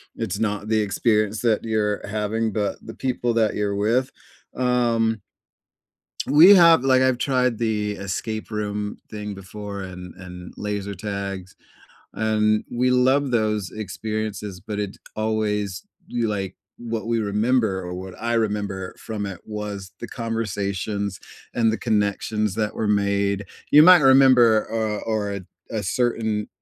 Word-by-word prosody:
"It's 100 +4 -3
not 105 -1 -2
the 110 -1 +3
experience 105 0 +1
that 115 -3 +2
you're 105 -2 0
having, 110 +1 -1
but 105 -1 -2
the - - -7
people 120 -2 -1
that 110 -2 +2
you're 100 -1 -1
with." 120 +6 +1 0.4
Um 115 -3 +1 1.1
we 165 +7 +9
have 170 -5 +7
like, 130 -1 +4
I've 130 -1 +3
tried 125 -3 +1
the 105 -2 -1
escape 110 +3 -4
room 105 -1 -3
thing 105 -1 -5
before 100 +1 -7
and 90 -2 -8
and 90 -1 -10
laser 100 -1 -3
tags, 100 -1 -5 0.6
and 110 -1 +1
we 125 +1 +1
love 130 +2 +3
those 105 -4 0
experiences, 105 -1 -4
but 105 +2 -5
it 100 -1 -3 0.2
always 105 -3 -1 0.2
you, 120 -2 -1
like 95 -3 -3 0.2
what 115 -1 -4
we 115 0 +1
remember 105 -1 +1
or 90 -1 -6
what 95 +1 -7
I 115 +1 -1
remember 100 -4 -2
from 105 -2 -4
it 95 -3 -7
was 105 -3 -6
the 120 - -6
conversations 100 -4 -3 0.4
and 115 -2 +3
the 110 - -2
connections 105 -1 0
that 105 -1 -1
were 110 - -2
made. 100 -1 +1 0.3
You 150 - +9
might 180 +1 +9
remember, 130 -5 +6
uh 110 -2 -1
or 105 -2 -1
a 100 - -4 0.3
a - - -2
certain, 110 0 0
105 Hz, 145 wpm, -23 LUFS, 100-115 Hz, 1.1 s, we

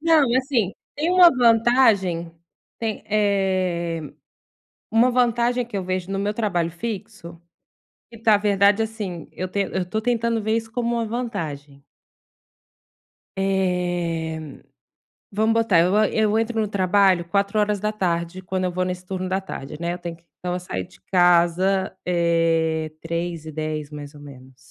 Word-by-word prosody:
Não, 310 -6 +4
assim, 255 -7 0 0.2
tem 310 +4 -1
uma 360 -1 +8
vantagem, 225 -8 +3 0.5
tem, 225 -2 -3
eh, 185 -5 0 0.9
uma 230 +3 +4
vantagem 245 0 +1
que 225 -3 -5
eu 190 - -3
vejo 185 0 -3
no 195 - -1
meu 205 +1 -1
trabalho 180 -7 -1
fixo, 200 -3 -7 0.7
que 230 - -12
na 215 -2 +6
verdade, 205 +1 +3
assim, 205 -7 -6
eu 185 - -4
ten 200 +2 -1
eu 185 -1 -1
tô 220 +3 -1
tentando 230 -1 0
ver 220 +1 0
isso 225 -1 -6
como 235 0 -1
uma 230 -1 -1
vantagem. 160 - -5 1.5
Eh, 175 -4 -1 0.9
vamos 220 +2 +2
botar, 225 -6 +3
eu 180 +4 +3
a 215 0 +4
eu 220 0 +2
entro 225 0 -1
no 215 - +1
trabalho 190 -2 +3
16h, 200 -2 -1
quando 185 0 -3
eu 180 - 0
vou 185 +1 -1
nesse 180 0 -4
turno 185 0 -4
da 190 +1 0
tarde, 150 -7 -8
né, 170 +1 -2
eu 180 - -7
tenho 170 -1 -6
que 170 - -30 0.2
então, 180 0 -3
eu 180 - -2
saio 95 - -5
de - - -21
casa, 180 +1 +3
eh, 165 -2 +1
15h10 160 -3 -4
mais 145 -1 -9
ou 145 - -13
menos. 130 -2 -13
190 Hz, 150 wpm, -23 LUFS, 170-220 Hz, 1.5 s, uma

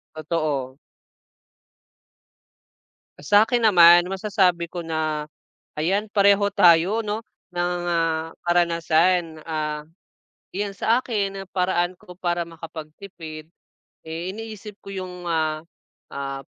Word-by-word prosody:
Totoo. 150 -4 -2 2.4
Ah, - - -13
sa'kin 220 - +4
naman 175 -3 +7
masasabi 190 -4 +1
ko 175 +1 -6
na 155 -2 -2 0.5
ayan 200 +6 0
pareho 200 0 +4
tayo 185 +1 +5
'no 215 0 -3 0.3
ng, 175 0 -1
ah, 165 -1 0
karanasan, 170 -1 +2
ah, 150 -1 -3 0.7
iyan 200 +1 -2
sa 235 +3 +2
akin 195 -5 -2
ang 185 - -15
paraan 180 -1 0
ko 180 - -13
para 175 -1 -2
makapagtipid, 160 0 -10 0.5
eh, 160 +2 -5
iniisip 215 -2 -8
ko 195 - -9
yung, 185 -2 -6
ah, 155 -2 -1 0.5
ah, 135 0 -5
175 Hz, 105 wpm, -23 LUFS, 160-195 Hz, 2.4 s, naman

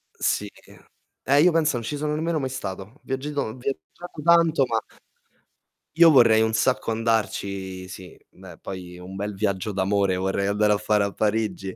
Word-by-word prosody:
Sì. 105 0 -1 0.8
Eh, 140 +1 +5
io 180 +1 +5
pensa 160 -5 +1
non 115 - -5
ci 145 - -3
sono 150 +1 -2
nemmeno 160 0 -1
mai 130 -1 -3
stato. 100 +2 -7
Viaggiato 140 +2 -3
ho 110 - -4
viaggiato 140 +5 -7
tanto, 165 -5 +4
ma 115 -1 0 1.2
io 165 -1 +7
vorrei 115 -5 +6
un 110 0 +1
sacco 115 0 +1
andarci. 100 -4 -2
Sì, 95 0 -11
beh, 90 -3 -14
poi 90 -2 -8
un 95 +2 -10
bel 100 +1 -4
viaggio 100 +1 -2
d'amore 100 0 +1
vorrei 95 +1 -1
andare 105 +1 +2
a - - +1
fare 105 -1 +1
a 100 - -2
Parigi. 105 -3 -2
110 Hz, 170 wpm, -24 LUFS, 95-135 Hz, 1.2 s, io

